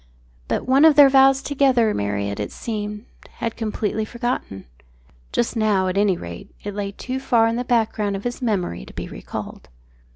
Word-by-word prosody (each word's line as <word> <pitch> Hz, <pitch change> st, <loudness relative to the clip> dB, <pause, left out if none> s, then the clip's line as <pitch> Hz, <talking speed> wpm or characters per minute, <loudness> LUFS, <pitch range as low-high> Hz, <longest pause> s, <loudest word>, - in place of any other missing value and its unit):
But -, -, -1 dB
one 265 Hz, +3 st, +4 dB
of 315 Hz, -2 st, +7 dB
their 285 Hz, -1 st, +8 dB
vows 270 Hz, 0 st, +5 dB
together 265 Hz, -6 st, +2 dB
Marriott, 100 Hz, 0 st, -2 dB
it 105 Hz, -, -3 dB
seemed, 210 Hz, -1 st, -5 dB, 0.3 s
had 230 Hz, -1 st, -4 dB
completely 220 Hz, -1 st, -2 dB
forgotten. 235 Hz, -, -4 dB, 0.7 s
Just 240 Hz, +1 st, 0 dB
now, 210 Hz, -4 st, +2 dB
at 185 Hz, -, -2 dB
any 200 Hz, -3 st, +2 dB
rate, 85 Hz, -, -9 dB
it 205 Hz, -, -5 dB
lay 200 Hz, 0 st, -3 dB
too 255 Hz, +6 st, -5 dB
far 235 Hz, -4 st, +3 dB
in 230 Hz, -, 0 dB
the 245 Hz, -, -1 dB
background 220 Hz, -4 st, 0 dB
of 195 Hz, -, -6 dB
his 245 Hz, +2 st, -4 dB
memory 190 Hz, -, -1 dB
to -, -, -13 dB
be -, -, -5 dB
recalled. -, -, -8 dB
220 Hz, 175 wpm, -22 LUFS, 200-250 Hz, 0.7 s, their